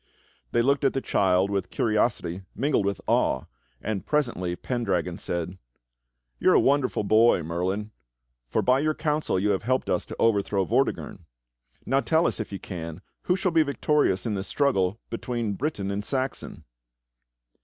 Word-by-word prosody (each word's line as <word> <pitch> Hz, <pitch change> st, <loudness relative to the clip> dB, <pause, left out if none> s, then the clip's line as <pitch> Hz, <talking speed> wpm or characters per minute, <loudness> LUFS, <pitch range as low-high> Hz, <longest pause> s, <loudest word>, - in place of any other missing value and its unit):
They 120 Hz, -, +2 dB
looked 140 Hz, +3 st, +2 dB
at 135 Hz, -, +3 dB
the 135 Hz, -, 0 dB
child 95 Hz, -5 st, +2 dB
with 100 Hz, -1 st, -1 dB
curiosity 105 Hz, -5 st, 0 dB
mingled 130 Hz, -5 st, +1 dB
with 100 Hz, -, -2 dB
awe, 65 Hz, -, +2 dB, 0.4 s
and 105 Hz, -3 st, -3 dB
presently 120 Hz, -12 st, 0 dB
Pendragon 90 Hz, -8 st, -2 dB
said: 85 Hz, +2 st, -4 dB, 0.8 s
"You -, -, +3 dB
are -, -, +6 dB
a -, -, +7 dB
wonderful 140 Hz, -5 st, +2 dB
boy. 110 Hz, -3 st, +4 dB
Merlin, 95 Hz, +6 st, -2 dB, 0.6 s
for -, -, +1 dB
by 130 Hz, +1 st, +4 dB
your 155 Hz, +1 st, +1 dB
counsel 150 Hz, -, 0 dB
you 105 Hz, +2 st, +2 dB
have 95 Hz, -, 0 dB
helped 130 Hz, +3 st, 0 dB
us -, -, 0 dB
to -, -, -7 dB
overthrow 100 Hz, -3 st, +2 dB
Vortigern. -, -, -1 dB, 0.6 s
Now 135 Hz, +2 st, +2 dB
tell 160 Hz, +4 st, +2 dB
us, -, -, 0 dB
if 110 Hz, -, -4 dB
you 100 Hz, -, -4 dB
can, 85 Hz, -3 st, -7 dB, 0.2 s
who 180 Hz, -, +3 dB
shall 185 Hz, -1 st, 0 dB
be 165 Hz, -1 st, +4 dB
victorious 145 Hz, -8 st, +1 dB
in 110 Hz, -, -1 dB
this 95 Hz, 0 st, -3 dB
struggle 110 Hz, -8 st, +1 dB
between 115 Hz, -2 st, -2 dB
Briton 100 Hz, -5 st, -2 dB
and 100 Hz, +1 st, -2 dB
Saxon." 130 Hz, +3 st, -3 dB
110 Hz, 165 wpm, -26 LUFS, 95-135 Hz, 0.8 s, a